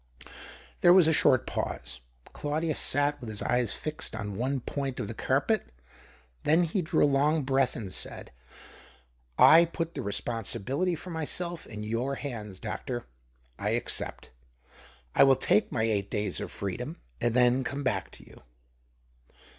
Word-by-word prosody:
There 175 - +7
was 180 -4 +7
a 160 - +4
short 130 -4 +4
pause. - - -4 0.3
Claudius 155 +1 -2
sat 145 +1 +1
with 120 - -6
his 105 -1 -4
eyes 125 -4 +1
fixed 155 -6 -4
on 105 -2 -5
one 130 +5 -1
point 135 +1 -4
of - - -3
the - - -5
carpet, 60 - 0 0.7
then 160 +4 +3
he 175 +3 0
drew 160 - +1
a - - +7
long 145 +2 +2
breath, 135 -1 +1
and 95 -5 -6
said - - -4 0.3
— 65 - -20
" - - -39
I 165 +2 +8
put 165 0 -3
the - - -4
responsibility 120 - -1
for 175 +3 -9
myself 170 +1 -2
in 105 -1 -7
your 115 +6 -1
hands, 110 -9 -6
doctor. 120 +4 -5 0.5
I - - +1
accept. - - -3 0.8
1 - - +7
will 135 - +6
take 105 -3 +2
my 110 - 0
eight 100 -3 0
days 105 -3 -2
of - - -4
freedom, 125 - -5 0.2
and 120 0 +1
then 125 +1 +4
come 140 +4 -4
back 100 -8 -1
to - - -11
you." - - -16
130 Hz, 160 wpm, -28 LUFS, 105-150 Hz, 0.8 s, I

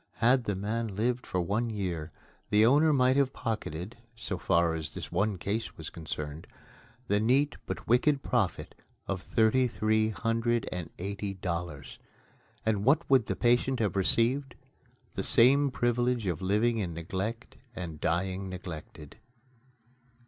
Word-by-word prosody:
Had 125 +1 +3
the 105 - -1
man 105 +2 -3
lived 120 +4 -1
for 90 - -1
one 105 +7 0
year, 90 -7 -3 0.4
the 105 +1 +5
owner 150 +6 +5
might 130 -1 +3
have 135 -1 +2
pocketed 105 - -4 0.2
(so 110 -5 -4
far 85 -2 +2
as 80 -2 -5
this - - -6
one 100 +3 0
case 105 +5 -3
was 80 - -7
concerned) 75 -1 -6 0.6
the 100 +1 +2
neat 135 +7 +2
but - - -5
wicked 135 +4 +3
profit 110 -7 -1 0.3
of 95 -2 -3
thirty 120 +4 +3
three 110 -1 +1
hundred 115 +1 0
and 90 -3 -4
eighty 100 +1 -4
dollars. 85 -6 -5 0.7
And 105 -2 +1
what 145 +8 +3
would 130 -4 +5
the - - -1
patient 125 +2 +2
have 105 -5 0
received? 120 +7 +1 0.6
The - - -2
same 140 +4 +4
privilege 120 -2 0
of 90 -2 -2
living 110 +5 +2
in 85 -5 -3
neglect 100 +9 -4 0.2
and 80 -6 -6
dying 95 +3 -1
neglected. 85 -3 -8
110 Hz, 145 wpm, -29 LUFS, 90-120 Hz, 0.7 s, the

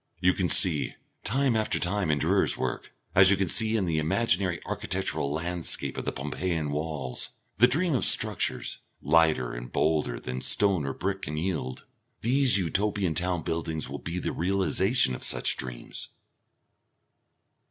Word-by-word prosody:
You 90 0 +3
can 90 -3 -1
see, 85 -7 +3 0.3
time 130 +1 0
after 110 -1 0
time, 95 -1 -1
in 75 - +2
Durer's - - +1
work, - - -4 0.2
as 95 0 +7
you 100 - +4
can 100 -1 0
see 110 +3 +2
in 100 - -1
the 80 -2 -1
imaginary 90 +1 +1
architectural 70 - -2
landscape 85 +2 -1
of - - -5
the - - -1
Pompeian 75 +2 -3
walls, 75 -4 -4 0.3
the 120 - +7
dream 165 +5 +1
of 125 - 0
structures, - - +3 0.2
lighter 75 -5 +2
and - - -8
bolder 75 -6 0
than 65 0 -6
stone 95 -8 +2
or 70 - -3
brick 95 0 -3
can 75 +1 -5
yield.... 80 -7 -4 0.4
These 130 -1 +4
Utopian 95 0 -1
town 90 0 -2
buildings 80 -2 -3
will - - -6
be 85 +1 -6
the - - -3
realisation 95 - +1
of - - -6
such - - +3
dreams. - - -5
85 Hz, 155 wpm, -27 LUFS, 75-100 Hz, 0.4 s, as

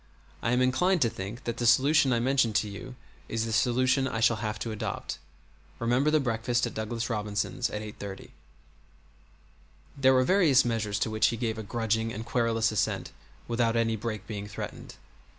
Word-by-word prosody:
I 115 - 0
am 125 +1 +3
inclined 180 +9 +2
to 115 - +1
think 115 +3 -7
that 120 0 -3
the 120 - 0
solution 135 +4 +5
I 120 - +2
mentioned 125 -3 +2
to 110 -1 +2
you 105 +6 -8 0.3
is 115 0 -1
the 115 - -3
solution 130 +4 +2
I 115 - -3
shall 115 0 +3
have 105 0 -3
to 115 - -3
adopt. 105 -7 -4 0.6
Remember 125 +5 +2
the 155 0 +3
breakfast 120 -1 0
at 120 - -5
Douglas 115 +1 -3
Robinson's 105 -3 -2
at 105 - -4
8:30." 100 -2 -8 1.6
There 130 -1 +4
were 130 - +4
various 155 -6 +4
measures 110 -3 -1
to 110 - -1
which 110 0 +3
he 115 - -1
gave 110 -2 -2
a - - -3
grudging 115 +1 -1
and 110 +1 -6
querulous 115 -1 +1
assent 105 - -1 0.4
without 115 -1 +1
any 115 -1 +1
break 110 -2 -5
being 105 -2 -6
threatened. 105 - -7
115 Hz, 180 wpm, -28 LUFS, 110-125 Hz, 1.6 s, solution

